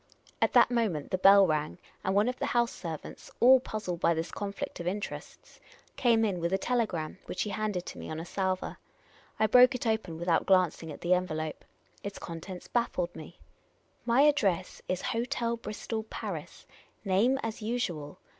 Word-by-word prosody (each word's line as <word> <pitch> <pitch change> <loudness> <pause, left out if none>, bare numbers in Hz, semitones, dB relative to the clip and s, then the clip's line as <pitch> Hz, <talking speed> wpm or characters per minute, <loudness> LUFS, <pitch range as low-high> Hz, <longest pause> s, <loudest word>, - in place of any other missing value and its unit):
At - - +2
that - - +6
moment 215 -12 0
the 185 - 0
bell 195 +1 +8
rang, 155 -2 -1 0.3
and 190 - 0
one 205 +3 +4
of 250 - -2
the - - -1
house 240 -1 +2
servants 160 -4 -7
— - - -38
all 260 +2 +8
puzzled 215 -8 -4
by 170 - +3
this 165 +1 -3
conflict 200 -1 -5
of 170 - -4
interests 200 +3 -6 0.2
— - - -27
came 230 -3 +3
in 190 -4 -1
with 170 +1 -1
a 190 - +3
telegram, 195 -9 -1
which - - -2
he 210 - -4
handed 210 -5 -3
me - - -8
on 155 - -4
a 165 - -6
salver. 185 0 -2 0.6
I 220 - +4
broke 250 +4 +6
it 250 - -4
open, 220 -7 -1
without 170 0 +1
glancing 180 -4 +2
at 145 - -10
the 175 +1 +3
envelope. 155 -4 -2 0.4
Its 200 0 -6
contents 175 +2 -8
baffled 185 -7 -1
me: 160 +2 -10 0.3
" - - -40 0.3
My 240 +3 +5
address 200 - +2
is 185 0 -2
Hotel 235 0 -1
Bristol, 220 0 -5
Paris; 220 - -7 0.4
name 205 +8 +3
as 225 0 -4
usual. 195 -11 -3
195 Hz, 185 wpm, -29 LUFS, 170-230 Hz, 0.6 s, bell